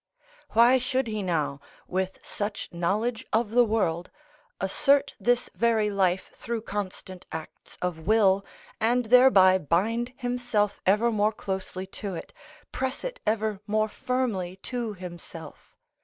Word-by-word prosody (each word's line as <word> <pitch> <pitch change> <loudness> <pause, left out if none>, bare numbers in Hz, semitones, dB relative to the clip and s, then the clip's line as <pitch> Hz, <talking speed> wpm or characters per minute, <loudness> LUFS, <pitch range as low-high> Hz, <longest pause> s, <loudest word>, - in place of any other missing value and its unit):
Why 240 +3 +6
should 255 +1 0
he 215 -2 -3
now, 160 -6 -1 0.3
with 185 +1 -2
such 205 0 -4
knowledge 215 +8 -1
of 220 -1 +1
the 245 +1 +6
world, 185 -7 0 0.5
assert 275 +9 +2
this 245 0 +2
very 225 -3 +2
life 190 -2 +1
through 230 -1 -4
constant 190 -3 -6
acts 160 -1 -9
of 180 -3 -1
will, 200 -3 +4 0.4
and 240 +2 +2
thereby 215 -6 +6
bind 225 - 0
himself 245 -5 -1
ever 215 +5 +4
more 215 0 +2
closely 190 -2 -4 0.2
to 200 -3 -3
it, - - -8 0.4
press 265 0 -3
it - - -5
ever 215 -2 0
more 215 +1 +1
firmly 210 -8 -2
to 235 -4 -3
himself? 175 -2 -10
210 Hz, 130 wpm, -27 LUFS, 185-240 Hz, 0.5 s, Why